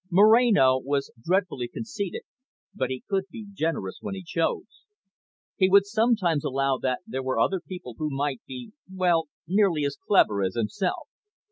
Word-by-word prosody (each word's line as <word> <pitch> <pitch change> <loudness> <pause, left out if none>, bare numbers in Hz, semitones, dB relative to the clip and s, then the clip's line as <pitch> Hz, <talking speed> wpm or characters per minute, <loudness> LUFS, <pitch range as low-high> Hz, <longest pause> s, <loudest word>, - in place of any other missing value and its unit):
Moreno 200 - +5
was 140 +1 -2
dreadfully 175 -8 0
conceited, 200 - -5 0.5
but 130 -1 -2
he 130 -1 -5
could 195 -2 0
be 220 +4 -9
generous 160 - -2
when 195 - -5
he 190 - -7
chose. 165 - -3 0.7
He 185 -1 +4
would 200 +1 +6
sometimes 210 - +1
allow 135 -2 0
that 130 -1 -1
there 130 - -4
were 130 -2 -1
other 190 +11 +2
people 175 -9 -9
who 155 - -1
might 140 -2 -2
be 130 +6 -8 0.2
well, 175 -4 +1 0.2
nearly 180 -5 +2
as 140 0 -3
clever 105 - +3
as 95 -1 -1
himself. 150 - -2
165 Hz, 155 wpm, -26 LUFS, 130-195 Hz, 0.7 s, would